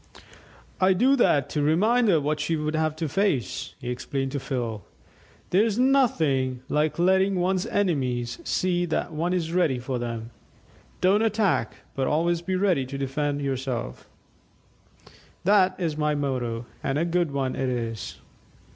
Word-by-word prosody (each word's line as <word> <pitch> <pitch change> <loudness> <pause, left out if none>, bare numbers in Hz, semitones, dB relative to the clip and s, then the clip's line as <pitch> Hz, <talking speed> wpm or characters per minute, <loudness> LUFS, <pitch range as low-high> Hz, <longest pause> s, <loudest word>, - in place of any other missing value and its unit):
"I 190 0 +5
do 255 +9 +4
that 145 - +3
to 150 - 0
remind 215 +11 +3
her 165 -5 +4
what 150 +1 -1
she 160 +2 0
would 155 0 -2
have 155 -1 0
to 160 0 -2
face," 145 - -1
he 120 - -4
explained 135 +2 -3
to 140 - -2
Phil. 120 -6 -3 0.7
"There's 210 +3 +3
nothing 160 - +2
like 150 +1 +1
letting 190 +2 +3
one's 185 +3 0
enemies 130 - -1
see 175 -1 0
that 160 - -2
one 165 +3 -1
is 170 -3 -1
ready 170 -8 +2
for 125 0 -3
them. 115 -1 -5 0.7
'Don't 195 +3 +4
attack, 215 -3 +1 0.2
but 135 -1 -1
always 170 +2 +1
be 185 +2 -2
ready 185 -7 +2
to 140 +1 -5
defend 145 +1 -2
yourself; 130 - -4 1.3
this 190 -1 +4
is 165 -5 -2
my 150 -1 +1
motto, 125 -5 -2 0.2
and 135 +1 -1
a 165 - +1
good 170 -1 +1
one 135 -2 -2
it 130 -1 -1
is." 115 -3 -4
155 Hz, 155 wpm, -25 LUFS, 130-185 Hz, 1.3 s, I